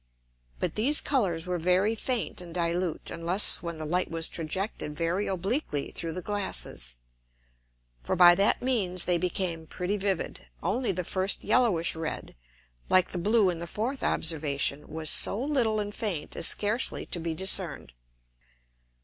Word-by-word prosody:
But -, -, -2 dB
these 270 Hz, +8 st, +3 dB
Colours 185 Hz, -, -1 dB
were 180 Hz, -1 st, -3 dB
very 185 Hz, +6 st, +2 dB
faint 230 Hz, -3 st, -2 dB
and 175 Hz, -1 st, -11 dB
dilute, 170 Hz, -1 st, -2 dB
unless 175 Hz, +5 st, +5 dB
when 170 Hz, -1 st, -6 dB
the 155 Hz, -, -6 dB
Light 180 Hz, +4 st, -1 dB
was 165 Hz, -1 st, -1 dB
trajected 165 Hz, -1 st, -3 dB
very 170 Hz, +5 st, -2 dB
obliquely 190 Hz, -, -2 dB
through 165 Hz, -1 st, -5 dB
the 180 Hz, +1 st, -6 dB
Glasses: 195 Hz, -, -1 dB, 1.1 s
For -, -, -2 dB
by 175 Hz, 0 st, +7 dB
that 200 Hz, +6 st, +1 dB
means 195 Hz, -9 st, 0 dB
they 175 Hz, -1 st, +1 dB
became 170 Hz, -2 st, -3 dB
pretty 185 Hz, +5 st, -3 dB
vivid. 190 Hz, -, -3 dB, 0.2 s
Only 240 Hz, +3 st, 0 dB
the 180 Hz, -1 st, -3 dB
first 190 Hz, +3 st, +1 dB
yellowish 195 Hz, -12 st, +3 dB
red, 160 Hz, 0 st, -5 dB, 0.6 s
like 185 Hz, -1 st, +3 dB
the 180 Hz, -, -2 dB
blue 205 Hz, 0 st, +2 dB
in 170 Hz, -, -7 dB
the 170 Hz, -, -6 dB
fourth 240 Hz, -, -3 dB
Observation, 150 Hz, -2 st, -1 dB
was 155 Hz, 0 st, +2 dB
so 205 Hz, -, +5 dB
little 245 Hz, -6 st, 0 dB
and 205 Hz, 0 st, -4 dB
faint 185 Hz, -10 st, -3 dB
as -, -, +3 dB
scarcely 215 Hz, +4 st, +1 dB
to 175 Hz, -, -4 dB
be 165 Hz, -1 st, -4 dB
discern'd. 175 Hz, -, 0 dB
180 Hz, 155 wpm, -27 LUFS, 165-205 Hz, 1.1 s, by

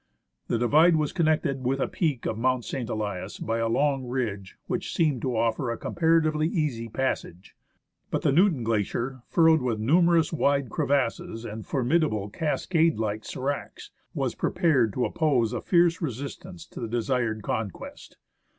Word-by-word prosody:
The 120 Hz, -, 0 dB
divide 155 Hz, +8 st, +5 dB
was 155 Hz, -2 st, 0 dB
connected 155 Hz, -6 st, +1 dB
with 130 Hz, +2 st, +1 dB
the 135 Hz, -, 0 dB
peak 150 Hz, -9 st, -1 dB
of -, -, -1 dB
Mount 125 Hz, +1 st, 0 dB
St. 125 Hz, -4 st, -4 dB
Elias 100 Hz, -3 st, -4 dB
by 115 Hz, +1 st, -2 dB
a 115 Hz, 0 st, 0 dB
long 140 Hz, +2 st, +1 dB
ridge 105 Hz, -7 st, -3 dB
which 185 Hz, +1 st, -3 dB
seemed 150 Hz, -, +1 dB
to 125 Hz, -3 st, -1 dB
offer 115 Hz, +3 st, 0 dB
a 115 Hz, -, -2 dB
comparatively 160 Hz, -2 st, +1 dB
easy 140 Hz, -10 st, -2 dB
passage. 105 Hz, -8 st, -3 dB, 0.5 s
But -, -, -2 dB
the -, -, +3 dB
Newton 165 Hz, -, +3 dB
Glacier, 115 Hz, +4 st, -1 dB
furrowed 160 Hz, -1 st, +4 dB
with 120 Hz, -3 st, -1 dB
numerous 165 Hz, +6 st, +3 dB
wide 140 Hz, -5 st, +1 dB
crevasses 120 Hz, -4 st, -1 dB
and 110 Hz, -1 st, -7 dB
formid 140 Hz, +5 st, +1 dB
able 105 Hz, -8 st, -2 dB
cascade 160 Hz, -, +1 dB
like 110 Hz, -1 st, -2 dB
sdracs, 140 Hz, +5 st, -5 dB, 0.2 s
was -, -, -1 dB
prepared 130 Hz, -10 st, +2 dB
to 125 Hz, -, 0 dB
oppose 125 Hz, -7 st, +1 dB
a -, -, -3 dB
fierce 175 Hz, 0 st, +3 dB
resistance 130 Hz, -, -6 dB
to -, -, -9 dB
the 115 Hz, -, -3 dB
desired 115 Hz, -2 st, -1 dB
conquest. 105 Hz, -4 st, -5 dB
130 Hz, 160 wpm, -26 LUFS, 115-155 Hz, 0.5 s, divide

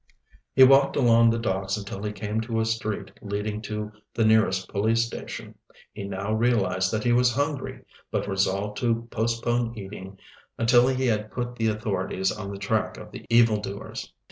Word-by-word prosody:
He 130 Hz, -, +8 dB
walked 135 Hz, +1 st, +6 dB
along 115 Hz, -3 st, +5 dB
the 115 Hz, -, +1 dB
docks 95 Hz, -3 st, -1 dB
until 100 Hz, -1 st, -6 dB
he 105 Hz, 0 st, -2 dB
came 105 Hz, +1 st, -3 dB
to 115 Hz, 0 st, -2 dB
a 110 Hz, -, +1 dB
street 110 Hz, -3 st, -3 dB
leading 105 Hz, +1 st, -3 dB
to 105 Hz, 0 st, -5 dB, 0.2 s
the 115 Hz, -, +2 dB
nearest 110 Hz, -4 st, +3 dB
police 110 Hz, +3 st, +1 dB
station. 115 Hz, -, -7 dB, 0.4 s
He 100 Hz, -2 st, -6 dB
now 100 Hz, +2 st, -3 dB
realized 105 Hz, -5 st, +1 dB
that 110 Hz, -1 st, -1 dB
he 120 Hz, -, +3 dB
was 125 Hz, 0 st, +3 dB
hungry, 145 Hz, -1 st, -2 dB, 0.2 s
but -, -, -2 dB
resolved 100 Hz, +1 st, 0 dB
to 115 Hz, -1 st, 0 dB
postpone 115 Hz, +1 st, -1 dB
eating 95 Hz, -1 st, -8 dB, 0.4 s
until 120 Hz, +2 st, +5 dB
he 130 Hz, 0 st, 0 dB
had 110 Hz, -3 st, 0 dB
put 120 Hz, -1 st, -4 dB
the 115 Hz, -1 st, 0 dB
authorities 95 Hz, -3 st, -1 dB
on 105 Hz, -2 st, -6 dB
the 100 Hz, -, -6 dB
track -, -, -1 dB
of -, -, -10 dB
the -, -, -10 dB
evildoers. 110 Hz, -4 st, +1 dB
110 Hz, 170 wpm, -26 LUFS, 100-115 Hz, 0.4 s, He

